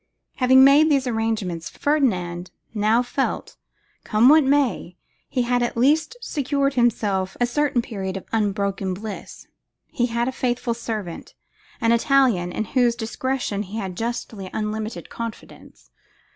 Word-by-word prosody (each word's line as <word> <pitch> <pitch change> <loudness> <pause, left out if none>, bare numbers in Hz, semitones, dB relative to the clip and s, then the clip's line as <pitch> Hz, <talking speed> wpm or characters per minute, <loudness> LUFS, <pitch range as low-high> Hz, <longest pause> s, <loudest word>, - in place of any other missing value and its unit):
Having 260 0 +6
made 290 +3 +6
these 275 -3 +2
arrangements, 220 -8 -2
Ferdinand 185 - 0 0.2
now 220 +3 +2
felt 270 +2 -2
that, - - -23 0.5
come 225 +3 +4
what 310 +1 +7
might, 270 -10 +1 0.3
he 250 - 0
had 245 0 +1
at 240 -1 -1
least 305 - +2
secured 280 - -1
for 250 - +1
himself 200 -5 0
a 245 - +3
certain 255 -1 0
period 195 -5 -4
of 190 - -9
unbroken 200 -3 -1
bliss. 210 +1 -8 0.5
He 245 -1 0
had 235 0 -1
a - - 0
faithful 245 -2 -1
servant, 215 -7 -6 0.4
an 230 -2 +2
Italian, 235 -7 +3
in 215 - -2
whose 245 0 +2
discretion 240 -2 -2
he 210 +2 -6
had 190 -4 -4
justly 225 -3 -4
unlimited 215 +1 -4
confidence. 230 -2 -9
235 Hz, 145 wpm, -23 LUFS, 205-260 Hz, 0.5 s, what